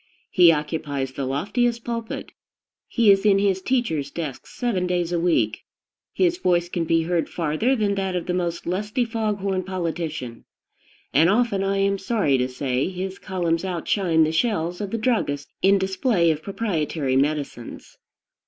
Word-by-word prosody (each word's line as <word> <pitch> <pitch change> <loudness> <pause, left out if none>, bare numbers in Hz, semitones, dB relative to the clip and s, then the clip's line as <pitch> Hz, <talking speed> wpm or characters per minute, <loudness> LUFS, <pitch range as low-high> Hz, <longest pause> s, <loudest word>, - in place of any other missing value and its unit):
He 175 -2 +7
occupies 150 -3 -2
the 135 +1 -4
loftiest 230 - 0
pulpit; 230 -1 -4 0.6
he 230 -4 +4
is 195 0 +3
in 205 -2 +5
his 195 -1 +1
teacher's 185 - 0
desk 150 -5 -6
seven 205 -8 -1
days 175 -1 0
in 170 - +1
the - - -3
week; 115 -11 +2 0.5
his 355 -1 +1
voice 175 - +1
can 170 -2 -2
be 165 0 +2
heard 170 0 0
farther 170 - 0
than 210 -4 +1
that 190 -2 -2
of 175 - -2
the 180 - -1
most 175 -2 -2
lusty 210 +7 -1
fog 220 -3 -2
horn 190 -1 0
politician; 165 -9 -4 0.7
and 160 +4 +5
often, 210 -2 +2
I 195 0 0
am 195 0 +1
sorry 190 - +1
to 125 - +1
say, 130 +2 -1
his 190 +1 -5
columns 170 -3 -1
outshine 175 -2 +1
the 155 - +1
shelves 175 -2 0
of 205 - -3
the 230 - -2
druggist 215 - -1
in 195 +1 +5
display 190 -2 +2
of 155 -1 -3
proprietary 160 -9 -1
medicines. 140 -3 -2
180 Hz, 165 wpm, -23 LUFS, 160-200 Hz, 0.7 s, He